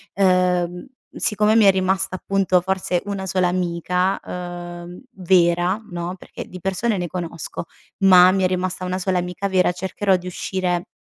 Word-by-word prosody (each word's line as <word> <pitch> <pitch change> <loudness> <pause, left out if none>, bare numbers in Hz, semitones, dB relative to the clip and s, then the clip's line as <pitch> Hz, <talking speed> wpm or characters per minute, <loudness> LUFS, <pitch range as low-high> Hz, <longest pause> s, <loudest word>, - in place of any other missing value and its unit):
uhm, 180 0 +1 0.3
siccome 210 +1 +2
mi 225 - +6
è 195 - +7
rimasta 190 0 0
appunto, 195 -1 +1
forse 185 -1 -1
una 200 -1 -4
sola 185 -1 +1
amica, 180 +1 0
uhm, 175 0 -7
vera 180 +1 +2
no, 175 +1 -4
perché - - -9
di 185 - -10
persone 195 +4 -1
ne 175 -1 -2
conosco, 170 -2 -6 0.3
ma 185 -2 +7
mi 190 0 0
è - - +4
rimasta 185 0 -2
una 185 0 -2
sola 185 -1 0
amica 180 +2 -3
vera; 185 -2 +2
cercherò 190 +2 0
di 180 0 -9
uscire 180 -1 -2
185 Hz, 160 wpm, -21 LUFS, 175-190 Hz, 0.3 s, è